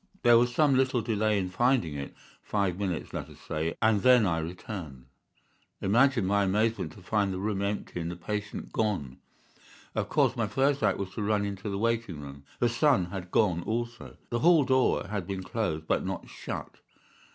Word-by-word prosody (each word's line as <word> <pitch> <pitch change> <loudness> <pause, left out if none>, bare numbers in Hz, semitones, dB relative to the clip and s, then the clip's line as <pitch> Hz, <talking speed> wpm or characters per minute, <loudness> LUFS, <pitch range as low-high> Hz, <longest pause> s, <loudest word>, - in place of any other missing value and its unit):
There 120 -1 +7
was 120 0 +2
some 145 +3 +3
little 130 -2 +2
delay 110 -1 +1
in 95 -2 -1
finding 120 - +2
it—five 90 +6 -4
minutes, 95 -4 -3
let - - -5
us - - -14
say—and 90 +7 0
then 125 -3 +6
I 85 -3 +1
returned. 80 - -7 0.7
Imagine 120 +2 +3
my 100 +1 +2
amazement 110 +4 0
to 100 - -15
find 100 0 +1
the 95 - -3
room 100 0 -2
empty 100 -3 -3
and 85 0 -3
the 85 - -5
patient 105 +4 -5
gone. 95 - -1 0.7
"Of - - -2
course, - - +2
my - - 0
first 140 +1 +1
act - - +2
was 95 -1 -4
to - - -5
run 105 0 +1
into 100 +1 -4
the 100 - -2
waiting 115 -6 -1
room. 70 -1 -10
The 120 - +2
son 120 - +2
had 95 -3 -6
gone 90 -4 +2
also. 120 +4 -4
The 120 - 0
hall 165 +1 +5
door 130 -1 +2
had 100 -4 -4
been 95 -1 -4
closed, 90 -5 -2
but - - +1
not - - -4
shut. - - -7
105 Hz, 185 wpm, -28 LUFS, 90-115 Hz, 0.7 s, There